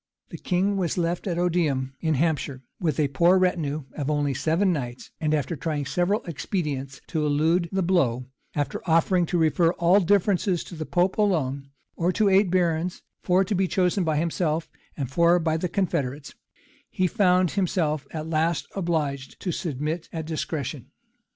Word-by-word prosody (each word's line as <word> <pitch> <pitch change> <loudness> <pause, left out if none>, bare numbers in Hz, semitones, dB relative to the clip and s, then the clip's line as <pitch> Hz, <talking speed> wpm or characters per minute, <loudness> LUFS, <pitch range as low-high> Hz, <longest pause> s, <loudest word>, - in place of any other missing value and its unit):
The - - -8
king 195 +2 0
was 180 -3 -1
left 175 +2 -1
at 175 -2 -1
Odiham, 160 -7 0
in 160 -2 0
Hampshire, 145 -3 -1 0.2
with 155 -6 -1
a 145 -2 +2
poor 170 +7 +4
retinue 160 -5 0
of 145 -1 -3
only 145 -2 +1
seven 170 +8 +1
knights; 125 -5 -5
and 155 -1 +1
after 155 +2 0
trying 150 -1 -2
several 180 - 0
expedients 145 -4 -4
to 155 -2 -1
elude 160 +4 +2
the 190 0 0
blow, 135 -9 +1 0.3
after 145 -1 -2
offering 170 +2 +3
to 175 - 0
refer 165 +1 +3
all 175 +3 +4
differences 195 -1 +2
to 175 - -10
the 155 -1 -5
pope 180 +3 +1
alone, 140 -9 0 0.3
or 175 +2 +1
to 210 0 +3
eight 195 0 +4
barons, 175 -1 0 0.2
four 185 +2 +3
to 195 - -2
be 190 -1 +1
chosen 185 +1 +1
by 160 -2 0
himself, 165 0 -1 0.3
and 135 -4 -3
four 170 +4 +4
by 160 -2 0
the 170 +2 -1
confederates,[] 145 -8 -2 0.6
he 185 - 0
found 185 -3 +3
himself 165 -6 0
at 155 -1 -5
last 160 +1 0
obliged 155 -7 -2
to 180 - -2
submit 155 +1 -3
at 160 -2 -4
discretion. 155 -4 -4
165 Hz, 170 wpm, -25 LUFS, 150-180 Hz, 0.6 s, poor